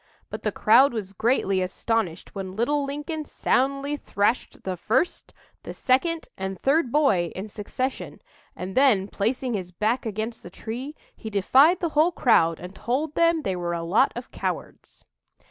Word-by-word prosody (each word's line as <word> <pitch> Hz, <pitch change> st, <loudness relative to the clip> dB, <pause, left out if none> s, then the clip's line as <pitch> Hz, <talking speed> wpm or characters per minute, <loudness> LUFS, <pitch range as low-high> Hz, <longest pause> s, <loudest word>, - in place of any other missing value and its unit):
But -, -, -5 dB
the -, -, -1 dB
crowd 275 Hz, -1 st, +5 dB
was 200 Hz, -4 st, -5 dB
greatly 195 Hz, -3 st, +1 dB
astonished 185 Hz, -1 st, -2 dB
when 190 Hz, -2 st, -6 dB
little 285 Hz, +7 st, +1 dB
Lincoln 295 Hz, +3 st, -4 dB
soundly 275 Hz, 0 st, 0 dB
thrashed 210 Hz, -1 st, -1 dB
the 185 Hz, -1 st, -3 dB
first, 245 Hz, -, -1 dB, 0.3 s
the -, -, -8 dB
second, 320 Hz, +6 st, +1 dB
and 190 Hz, -1 st, -5 dB
third 275 Hz, -2 st, +2 dB
boy 210 Hz, -, +2 dB
in 190 Hz, +3 st, -5 dB
succession; 225 Hz, +6 st, -4 dB, 0.4 s
and 185 Hz, +1 st, -6 dB
then, 250 Hz, -8 st, +4 dB
placing 240 Hz, +5 st, -1 dB
his 185 Hz, -4 st, -4 dB
back 220 Hz, +6 st, -1 dB
against 220 Hz, +2 st, -4 dB
the -, -, -10 dB
tree, 255 Hz, +7 st, -6 dB, 0.2 s
he 220 Hz, -, -7 dB
defied 265 Hz, -, +4 dB
the 340 Hz, -, 0 dB
whole 310 Hz, +3 st, +3 dB
crowd, 165 Hz, -, +3 dB
and 180 Hz, +2 st, -9 dB
told 275 Hz, +9 st, -2 dB
them 335 Hz, -1 st, +2 dB
they 190 Hz, -, -1 dB
were 175 Hz, -1 st, -3 dB
a 165 Hz, -, -4 dB
lot 205 Hz, +11 st, +3 dB
of 240 Hz, +1 st, -7 dB
cowards." -, -, -6 dB
235 Hz, 165 wpm, -25 LUFS, 190-280 Hz, 0.4 s, crowd